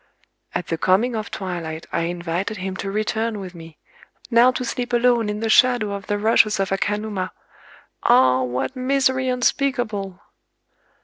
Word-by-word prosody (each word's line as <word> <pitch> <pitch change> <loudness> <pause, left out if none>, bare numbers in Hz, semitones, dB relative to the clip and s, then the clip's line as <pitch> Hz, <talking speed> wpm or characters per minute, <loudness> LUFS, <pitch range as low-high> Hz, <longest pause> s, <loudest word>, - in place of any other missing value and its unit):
[_"At 180 - -2
the 165 - -3
coming 215 +8 +2
of 215 -2 -4
twilight 170 -4 -5
I 165 - 0
invited 175 +4 -3
him 190 0 -4
to 195 - -4
return 215 +1 -1
with 185 -2 -8
me—! 165 -2 -12 0.5
Now 235 +2 +6
to 255 0 -2
sleep 245 +1 -4
alone 240 -2 +3
in 210 +1 -3
the 225 - 0
shadow 235 -2 +4
of 200 -1 -7
the 205 - 0
rushes 215 0 +3
of 195 -1 -1
Akanuma—ah! 190 - -1
what 125 - -2
misery 260 0 +1
unspeakable!" 245 -7 -1
210 Hz, 145 wpm, -22 LUFS, 185-240 Hz, 0.5 s, Now